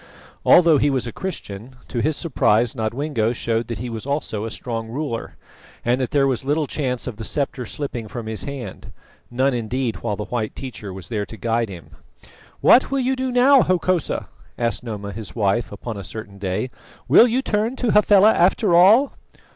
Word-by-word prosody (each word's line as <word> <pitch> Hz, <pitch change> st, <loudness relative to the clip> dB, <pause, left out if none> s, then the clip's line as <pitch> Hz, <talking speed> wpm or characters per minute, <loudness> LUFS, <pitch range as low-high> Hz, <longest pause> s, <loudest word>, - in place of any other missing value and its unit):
Although 165 Hz, -4 st, +6 dB
he 145 Hz, -, +3 dB
was 130 Hz, -3 st, 0 dB
a 120 Hz, -, -5 dB
Christian, 130 Hz, -, -6 dB
to 120 Hz, -, -2 dB
his 155 Hz, +2 st, 0 dB
surprise 120 Hz, -6 st, +2 dB
Nodwengo 115 Hz, +1 st, -1 dB
showed 115 Hz, -1 st, -1 dB
that 115 Hz, -3 st, -4 dB
he 125 Hz, -, -5 dB
was 115 Hz, +1 st, -6 dB
also 135 Hz, -7 st, -2 dB
a -, -, -3 dB
strong 115 Hz, 0 st, -5 dB
ruler, 120 Hz, -1 st, -4 dB, 0.5 s
and 125 Hz, +2 st, +2 dB
that 130 Hz, -, -1 dB
there 140 Hz, -2 st, +2 dB
was 130 Hz, -3 st, 0 dB
little 150 Hz, +3 st, 0 dB
chance 130 Hz, -4 st, -2 dB
of 120 Hz, -5 st, -6 dB
the 115 Hz, -, -6 dB
sceptre 135 Hz, -2 st, -2 dB
slipping 125 Hz, -6 st, -5 dB
from 115 Hz, +1 st, -6 dB
his 110 Hz, -4 st, -4 dB
hand 140 Hz, -3 st, -7 dB, 0.4 s
none 130 Hz, +3 st, +1 dB
indeed 120 Hz, 0 st, -2 dB
while 110 Hz, -3 st, -3 dB
the 105 Hz, +1 st, -5 dB
white 115 Hz, -3 st, -3 dB
teacher 120 Hz, -7 st, -7 dB
was 95 Hz, -1 st, -9 dB
there 105 Hz, -3 st, -2 dB
to 115 Hz, -, -10 dB
guide 115 Hz, +2 st, 0 dB
him. 90 Hz, -3 st, -10 dB, 0.7 s
"What 255 Hz, -, +6 dB
will 275 Hz, -, 0 dB
you 260 Hz, +1 st, +1 dB
do 260 Hz, 0 st, -2 dB
now, 260 Hz, +2 st, +6 dB
Hokosa?" 185 Hz, -2 st, 0 dB, 0.3 s
asked 115 Hz, -1 st, -1 dB
Noma 105 Hz, -4 st, -5 dB
his 105 Hz, 0 st, -8 dB
wife 105 Hz, +1 st, 0 dB
upon 105 Hz, +2 st, -6 dB
a 100 Hz, -, -6 dB
certain 100 Hz, 0 st, -8 dB
day. 100 Hz, +6 st, -2 dB, 0.4 s
"Will 240 Hz, -, +7 dB
you 250 Hz, +3 st, 0 dB
turn 220 Hz, +3 st, 0 dB
to 245 Hz, -4 st, 0 dB
Hafela 210 Hz, 0 st, +6 dB
after 175 Hz, -1 st, +3 dB
all?" 215 Hz, +11 st, +6 dB
125 Hz, 190 wpm, -22 LUFS, 110-155 Hz, 0.7 s, Will